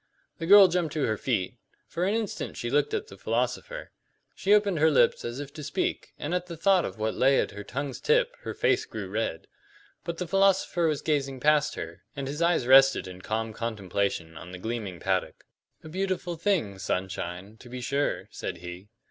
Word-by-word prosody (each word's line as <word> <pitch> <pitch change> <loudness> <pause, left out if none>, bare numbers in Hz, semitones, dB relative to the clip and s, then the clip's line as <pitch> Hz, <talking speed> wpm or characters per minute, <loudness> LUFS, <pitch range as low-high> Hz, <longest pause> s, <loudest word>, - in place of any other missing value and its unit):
The 165 - -3
girl 200 0 +10
jumped 170 -4 -1
to 150 -3 0
her 110 - 0
feet; 115 -1 -2 0.3
for 175 - -2
an 205 - +1
instant 225 -2 -3
she - - -3
looked 435 - +2
at 435 -1 -2
the - - -14
philosopher. - - -2 0.4
She 195 - -1
opened 205 -5 +4
her 160 +1 +5
lips 125 -6 +3
as 120 +3 -4
if 145 -1 -7
to 155 -1 -8
speak, 170 +6 -2
and 150 +4 -4
at 180 0 -1
the 170 -2 -7
thought 185 +2 +4
of - - -6
what 110 0 -1
lay 135 +1 +4
at - - 0
her 105 0 -8
tongue's 140 +4 -5
tip - - +2
her - - -6
face 405 +2 +2
grew - - -6
red. - - -3 0.6
But 170 0 -4
the 180 - -3
philosopher 195 -2 +3
was 150 -3 -1
gazing 140 -4 0
past 150 +2 +3
her, 85 +4 -7
and 140 -1 -4
his 145 +4 -4
eyes 170 -6 +3
rested 135 -1 +6
in 90 0 -9
calm 110 +2 -2
contemplation 100 -7 -2
on 90 - -10
the 90 - -7
gleaming 105 -3 -4
paddock. - - -1 0.4
"A - - -9
beautiful 185 0 -2
thing, 160 - 0
sunshine, 95 +2 -4
to 120 - -14
be 125 +1 -6
sure," 140 +4 -1
said - - -5
he. 90 +3 -9
140 Hz, 200 wpm, -27 LUFS, 110-180 Hz, 0.6 s, girl